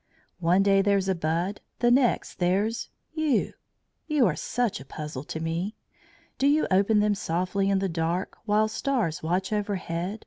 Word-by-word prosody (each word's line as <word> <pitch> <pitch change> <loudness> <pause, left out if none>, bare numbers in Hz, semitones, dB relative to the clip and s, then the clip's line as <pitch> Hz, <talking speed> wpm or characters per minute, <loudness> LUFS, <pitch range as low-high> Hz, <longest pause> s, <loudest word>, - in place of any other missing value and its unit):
One 180 +3 +3
day 195 0 +4
there's 200 -1 +2
a 190 - +3
bud; 170 +4 -1 0.2
the 240 0 +3
next, 250 -1 +2
there's 200 +6 0 0.2
you! 315 -5 +1 0.5
You 300 -5 +3
are 175 -7 +2
such 245 -4 -1
a - - -9
puzzle 150 -1 -6
to 160 - -5
me. 165 +6 -2 0.6
Do 275 - +3
you 300 +2 +3
open 200 +3 +4
them 210 0 +3
softly 185 +1 -1
in 195 - +3
the 195 0 0
dark, 170 +2 -2
While 215 0 +3
stars 220 - -1
watch 180 +6 -1
overhead? 200 -1 -2
195 Hz, 165 wpm, -26 LUFS, 170-215 Hz, 0.6 s, day